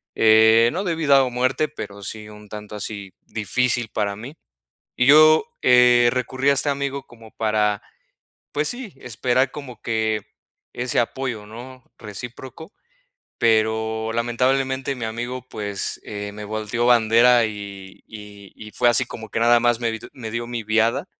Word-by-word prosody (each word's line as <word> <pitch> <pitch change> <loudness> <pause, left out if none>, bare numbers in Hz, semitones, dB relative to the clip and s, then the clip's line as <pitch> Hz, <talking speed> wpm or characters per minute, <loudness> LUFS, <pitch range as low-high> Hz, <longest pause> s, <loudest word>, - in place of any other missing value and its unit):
eh, 110 +1 +6
no 190 +3 -2
de 170 -3 -1
vida 140 -4 +4
o 130 - -1
muerte, 130 +5 0
pero 100 -9 -8
sí 105 +2 -6
un 105 -1 -14
tanto 105 0 -8
así 100 -2 -6
difícil 120 +2 0
para 100 -2 -2
mí. 130 +8 -9 0.6
Y 125 - +3
yo, 155 +2 +7 0.2
eh, 125 -1 +6
recurrí 130 +2 -1
a - - +5
este 140 +2 0
amigo 140 -1 -3
como 115 -2 -16
para, 105 -2 0 0.7
pues 150 +1 -1
sí, 245 -5 -6
esperar 125 +3 -1
como 140 -4 -9
que 110 -1 -1 0.5
ese 125 0 -2
apoyo, 120 -3 -2
¿no?, 125 +4 -11
recíproco, 125 - -9 0.7
pero 110 0 +1
lamentablemente, 130 +3 0
mi 115 - -5
amigo, 120 +3 -5
pues, 100 -2 -4
eh, 105 -1 -6
me 105 0 -9
volteó 110 +3 -2
bandera 120 0 +5
y 100 -2 -9
y 105 -2 -12
y 110 -1 -11
fue 120 - +2
así 120 +1 +3
como 110 -2 -9
que - - -2
nada 120 0 +5
más 120 -1 +2
me 115 -1 -1
di 115 - -6
me 110 -4 -8
dio 120 0 -3
mi 120 -2 -4
viada. 115 - +1
115 Hz, 160 wpm, -22 LUFS, 110-130 Hz, 0.7 s, yo